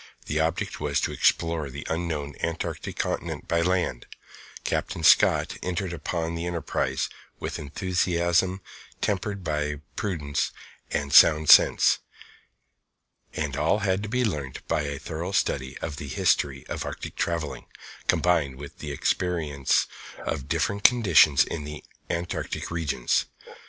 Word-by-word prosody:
The 75 - -1
object 80 +2 -1
was 75 -1 0
to - - -1
explore 80 -3 +1
the 70 +2 -8
unknown 80 -4 -2
Antarctic 85 0 -3
Continent - - -3
by 85 0 +2
land. 90 -8 0 0.6
Captain 80 - -2
Scott - - +5
entered 90 0 -2
upon 85 +1 -3
the 85 +1 -3
enterprise 85 -3 -1 0.3
with - - -4
enthusiasm 90 +3 0 0.4
tempered 100 -1 -2
by 75 -2 -1 0.2
prudence 75 -8 -1 0.4
and 70 0 -2
sound 75 +1 +7
sense. - - +6 1.6
All 75 +8 +2
had 95 0 +1
to 110 - -5
be 125 +2 +1
learnt 75 - -4
by - - +1
a 70 -1 -3
thorough 85 +7 -5
study 65 -8 0
of 75 -3 -4
the 75 - -6
history 65 0 +1
of - - -4
Arctic - - -6
travelling, 80 -7 -2 0.4
combined 80 -7 +2
with 70 +1 -10
experience 75 -1 0 0.3
of 65 - -4
different 100 +7 0
conditions 95 - +6
in 80 - -5
the 75 +1 -8 0.3
Antarctic 85 0 -3
Regions. 80 -7 0
80 Hz, 125 wpm, -26 LUFS, 70-90 Hz, 1.6 s, sound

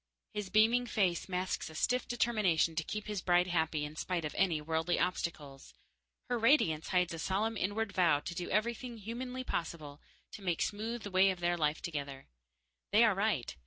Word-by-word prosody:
His 210 -2 -4
beaming 225 +5 +4
face 190 -6 0
masks 185 -1 -2
a 160 - -12
stiff 250 +9 0
determination 210 -9 +1
to 165 - 0
keep 210 +5 -5
his 210 -3 -3
bride 175 0 +3
happy 160 -4 0
in 150 +1 -8
spite 170 0 -2
of 150 - -4
any 180 -5 +2
worldly 160 +3 0
obstacles. 145 - -3 0.5
Her 245 -1 -1
radiance 220 - +3
hides 180 -2 +1
a 165 - -6
solemn 205 +7 0
inward 205 +2 -1
vow 170 -6 +4
to 170 - -6
do 175 +1 -4
everything 235 +3 -1
humanly 250 +4 -5
possible 155 - -4 0.3
to - - -9
make 175 -4 0
smooth 220 +2 -3
the 205 - -6
way 190 +1 +5
of 185 -2 -2
their 175 0 +1
life 155 -2 0
together. 140 -5 -5 0.7
They - - +6
are - - +5
right. - - -1
180 Hz, 185 wpm, -33 LUFS, 160-215 Hz, 0.7 s, They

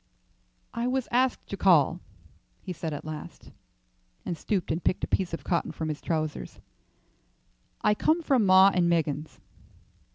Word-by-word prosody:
"I 235 +1 -2
was 260 0 -1
asked 255 +1 +1
to - - -3
call," - - +3 0.6
he 185 - -5
said 160 -1 -5
at 145 0 -6
last, 155 -1 -9 0.7
and 175 - -2
stooped 185 +1 -2
and 160 +2 -2
picked 185 - 0
a - - 0
piece 185 -2 0
of 165 - -5
cotton 170 - -1
from 160 -1 -4
his 150 - -4
trousers. 155 -2 -3 1.2
"I 210 - +4
come 320 +10 +1
from 265 -7 +3
'Maw 190 0 +7
and 175 -2 +2
Meggins.'" 155 -3 -1
175 Hz, 155 wpm, -27 LUFS, 155-210 Hz, 1.2 s, Maw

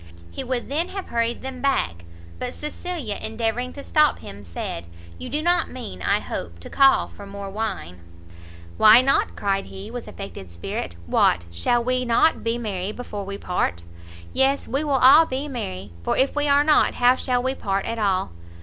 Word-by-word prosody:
He - - -5
would 250 -1 -2
then 310 +6 0
have 390 -1 -6
hurried 235 0 -1
them 260 -1 -6
back; 85 - 0 0.3
but - - -4
Cecilia, 300 - -4
endeavouring 230 +3 -2
to 280 - -8
stop 305 0 +3
him, 100 +1 -10
said 85 -1 -6 0.3
"You - - -6
do 300 +4 -2
not 350 0 +2
mean, 95 - -8
I - - +2
hope, 85 -1 -6
to - - -10
call 275 -1 +5
for 200 - -12
more 200 0 -7
wine?" 195 - -4 0.8
"Why 220 +3 +8
not?" 275 +1 +1
cried 195 -1 -1
he, 195 +3 -9
with 245 -1 -6
affected 195 - -8
spirit, 85 +1 -5
"what, 85 +1 +2
shall 235 - +1
we 255 +1 0
not 240 +6 +3
be 230 +1 0
merry 200 -4 -3
before 210 -4 -6
we 200 0 -5
part? 135 - -1 0.5
Yes, 270 +1 +2
we 275 +3 -1
will 295 -2 0
all 275 +6 +7
be 265 +3 -3
merry, 95 - -5
for - - -1
if 270 +2 +2
we 295 0 +1
are 285 0 +5
not, 300 0 +4
how 245 0 +5
shall 250 -1 0
we 260 +1 0
part 195 -6 -2
at 230 - -3
all? 190 - +1
235 Hz, 185 wpm, -23 LUFS, 195-270 Hz, 0.8 s, Why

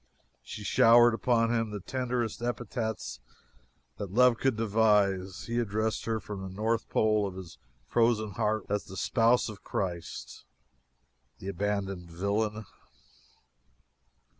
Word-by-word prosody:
She - - -8
showered 120 +1 +6
upon 115 0 +2
him 115 -1 0
the 105 -1 -5
tenderest 125 +1 -2
epithets 120 -3 -3 0.8
that 100 - -5
love 125 +2 +5
could 135 -3 +1
devise, 105 -4 +2
he 120 +1 -1
addressed 110 0 -1
her 115 -1 -1
from 105 -2 -7
the 95 - -6
North 110 +4 -1
Pole 110 -1 +2
of 95 - -7
his 95 -3 -10 0.3
frozen 110 - +2
heart 105 +2 -1
as 105 0 -1
the 95 - -9
"Spouse 120 +3 +3
of 105 -3 -9
Christ!" 85 -4 -5 0.9
The 95 - -6
abandoned 100 -3 -2
villain! 105 +5 -1
110 Hz, 125 wpm, -29 LUFS, 100-115 Hz, 0.9 s, showered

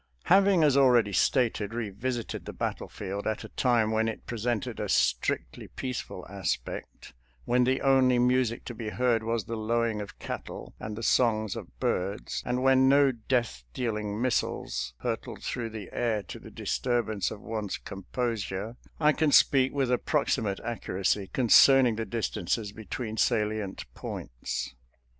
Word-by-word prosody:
Having, 195 -2 +5
as 145 -3 +4
already 120 -7 +4
stated, 115 -2 +1
revisited 120 +2 -3
the - - -6
battle - - -3
field 100 0 -5
at 110 -1 -2
a - - -9
time 120 -4 +2
when 110 0 +1
it 110 - -5
presented 120 -1 -2
a - - -3
strictly - - 0
peace 130 -2 -4
ful 90 - -9
aspect 95 -10 -4 0.2
— - - -34
when 125 0 +3
the 130 +1 +1
only 130 -2 +4
music 125 -1 +2
to 120 - -5
be 110 -1 -5
heard 120 0 +1
was 115 -2 -2
the 115 - -4
lowing 115 0 0
of 100 - -9
cattle - - -7
and 105 -1 -5
the 115 - -5
songs 110 -4 +2
of - - -9
birds, 100 +3 -2
and 125 +1 0
when 130 0 +5
no 140 0 +5
death 120 - -1
dealing 105 -3 -2
missiles 125 -1 -1
hurtled - - -4
through 115 -2 -3
the 110 -3 -7
air 110 -4 0
to - - -9
the - - -12
disturbance 115 -6 -1
of 105 - -8
one's 110 -3 -4
com 95 -1 -10
posure 115 -2 -2
— - - -31
I 150 -1 +5
can 155 -1 +1
speak 135 -1 +5
with 135 -3 0
approximate 125 -6 0
accuracy 100 -3 -1
concerning 130 0 +6
the 115 - -2
distances 110 -2 -2
between 110 +1 -6
salient 105 -4 0
points. - - -5
115 Hz, 160 wpm, -28 LUFS, 105-125 Hz, 0.2 s, concerning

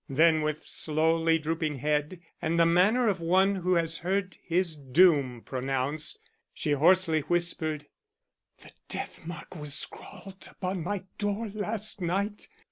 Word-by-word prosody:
Then 160 +3 +4
with 155 0 -2
slowly 160 +1 +2
drooping 155 -1 -2
head, 150 +5 -1 0.2
and 170 0 0
the 165 - +6
manner 195 +9 +4
of 195 -4 +1
one 190 +4 +3
who 180 0 +1
has 165 -1 0
heard 190 +1 -1
his 175 -1 0
doom 140 -3 +3
pronounced, 135 +3 -2 0.4
she 150 - -1
hoarsely 165 +2 +4
whispered; 160 -2 -1 0.8
"The - - -13 0.2
death - - -5
mark 175 +2 -8
was 150 -3 -2
scrawled 195 +4 -6
upon 185 -1 -4
my 200 +2 -3 0.2
door 205 +2 -1
last 215 0 -2
night. 200 +4 -2
165 Hz, 135 wpm, -28 LUFS, 155-190 Hz, 0.8 s, the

